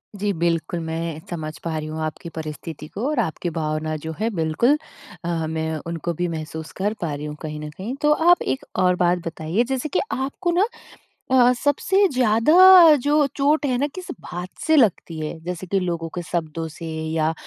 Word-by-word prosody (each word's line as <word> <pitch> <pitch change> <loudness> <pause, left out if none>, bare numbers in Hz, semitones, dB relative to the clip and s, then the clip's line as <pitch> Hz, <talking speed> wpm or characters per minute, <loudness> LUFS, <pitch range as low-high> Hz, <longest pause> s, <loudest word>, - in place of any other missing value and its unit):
जी 205 +1 -1
बिल्कुल, 170 0 0
मैं 165 -1 -4
समझ 155 -3 -5
पा 160 -2 -2
रही 155 0 -4
हूँ 155 +1 -5
आपकी 155 +2 -6
परिस्थिति 155 -1 -6
को 215 - -4
और 300 -5 0
आपकी 175 -3 -1
भावना 155 -1 -2
जो 160 - -3
है 225 - +1
बिल्कुल। 165 - +2 0.5
अ, - - -1 0.2
मैं 160 0 -2
उनको 170 0 -3
भी 175 +2 -1
महसूस 160 -1 -6
कर 205 +3 0
पा 160 -4 -2
रही 145 +1 -5
हूँ 150 0 -5
कहीं 155 -1 -5
न 150 0 -6
कहीं। 200 - -6
तो 300 - +4
आप 345 +3 +4
एक 130 0 -2 0.2
और 180 0 +4
बात 175 0 +2
बताइए 165 +7 -1
जैसे 265 +3 -2
कि - - +1
आपको 275 +7 -2
ना 370 +5 +3 0.6
अ - - +4
अ, - - +5
सबसे 370 +10 +2
ज़्यादा 230 +3 +3 0.5
जो 295 0 +3
चोट 290 +2 +2
है 255 -2 +1
ना 285 - +1
किस 370 - -6 0.2
बात 180 +1 -6 0.2
से 315 - +4
लगती 200 - +2
है। 155 +1 -5
जैसे 180 +1 -5
कि 195 +2 +1
लोगों 170 -3 -2
के 175 - -2
शब्दों 165 -1 -3
से 160 +2 -9 0.3
या 160 0 +1
170 Hz, 200 wpm, -22 LUFS, 160-245 Hz, 0.6 s, अ